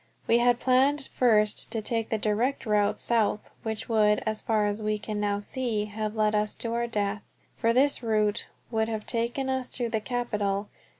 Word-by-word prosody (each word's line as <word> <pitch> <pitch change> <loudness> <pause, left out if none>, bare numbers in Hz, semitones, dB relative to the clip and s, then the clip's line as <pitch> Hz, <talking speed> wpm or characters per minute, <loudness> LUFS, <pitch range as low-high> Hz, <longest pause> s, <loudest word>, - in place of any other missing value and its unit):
We 235 - +4
had 240 0 +3
planned 270 +3 +2
first 215 -4 +3
to 225 - -2
take 225 +1 -1
the 220 - 0
direct 220 +7 0
route 210 -2 +2
south, 220 -3 0
which 220 -2 -4
would, 210 -2 +3
as 215 0 -1
far 215 -2 +1
as 205 +1 -2
we 215 0 0
can 210 0 -5
now 205 -1 0
see, 215 0 -2
have 215 +1 -4
led 215 -1 +2
us 210 0 0
to 230 -1 -4
our 235 0 0
death, 205 -2 -1 0.3
for 230 -1 +1
this 270 +4 +3
route 215 -3 +1 0.2
would 220 -1 +1
have 220 -1 -4
taken 240 +3 -1
us 260 -1 -1
through 240 -2 -3
the 220 -1 -1
capital. 210 -4 -2
220 Hz, 190 wpm, -27 LUFS, 210-240 Hz, 0.3 s, We